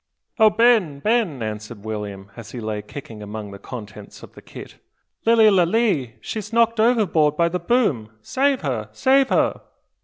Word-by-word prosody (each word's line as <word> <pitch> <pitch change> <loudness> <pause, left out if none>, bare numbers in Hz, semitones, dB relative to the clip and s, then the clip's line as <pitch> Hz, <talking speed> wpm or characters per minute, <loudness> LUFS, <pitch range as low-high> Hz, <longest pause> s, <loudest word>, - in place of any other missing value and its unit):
"O 220 -1 +7
Ben! 215 -8 +3
Ben!" 195 - 0
answered 110 0 -7
William, 105 -2 -6
as 110 -2 -11
he 125 - -5
lay 110 -2 -4
kicking 110 -1 -10
among 105 0 -7
the 100 - -10
contents 105 -2 -10
of - - -13
the - - -14
kit, - - -12 0.5
"Lilly 225 -1 +6
Lalee, 180 - +1
she's 215 0 -6
knocked 230 0 +2
overboard 195 -11 +2
by 170 - +3
the 180 +1 -3
boom! 170 - 0
Save 270 - 0
her! 120 -7 -3
save 265 - +3
her!" - - +1
150 Hz, 160 wpm, -22 LUFS, -, 0.5 s, O